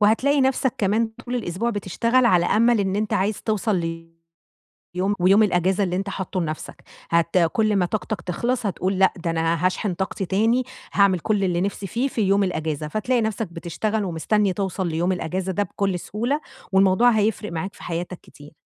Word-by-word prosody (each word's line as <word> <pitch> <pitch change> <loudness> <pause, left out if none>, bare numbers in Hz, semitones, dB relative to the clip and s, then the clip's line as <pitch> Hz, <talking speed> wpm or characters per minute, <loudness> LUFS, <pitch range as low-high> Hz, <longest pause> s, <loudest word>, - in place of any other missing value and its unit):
وهاتلاقي 260 +7 +3
نَفسك 265 -1 +1
كمان 220 +3 +1
طول 245 0 -4
الأسبوع 225 +1 -2
بتشتغل 230 +5 +1
على 175 -5 +4
أمل 230 0 +3
إن 195 0 0
أنت 215 -1 -1
عايز 200 +2 0
توصل 215 -1 0
ليوم 165 -1 -7 0.9
ويوم 195 +4 +5
الأجازة 190 0 +2
اللي 180 -1 -1
أنت 195 +1 -2
حاطّه 190 -1 -3
لنَفسك. 155 -2 -6 0.3
هت 170 +1 +2
كُلّ 210 +5 +2
ما 185 -2 +2
طاقتك 210 -1 -3
تخلص 235 +8 -2
هتقول 190 0 -1
لأ، 190 - +5
ده 170 -1 -3
أنا 165 +1 0
هاشحن 185 +1 0
طاقتي 190 +1 -3
تاني، 225 +7 +2 0.3
هاعمل 195 -3 +4
كُلّ 205 +2 0
اللي 175 -1 +1
نِفسي 200 0 -3
فيه 240 +9 -1
في 230 - -2
يوم 200 0 +3
الأجازة، 155 -4 -2
فتلاقي 235 +7 0
نَفسك 220 -1 -2
بتشتغل 205 +6 -2
ومستني 195 +3 0
توصل 190 -1 -2
ليوم 170 +3 0
الأجازة 185 +1 -2
ده 205 +3 0
بكُلّ 195 -3 -2
سهولة، 240 - -2 0.3
والموضوع 195 +5 +5
هيفرق 210 -2 0
معاك 170 +4 -4
في - - -14
حياتك 175 +1 -4
كتير. 145 0 -15
195 Hz, 175 wpm, -23 LUFS, 175-215 Hz, 0.9 s, ويوم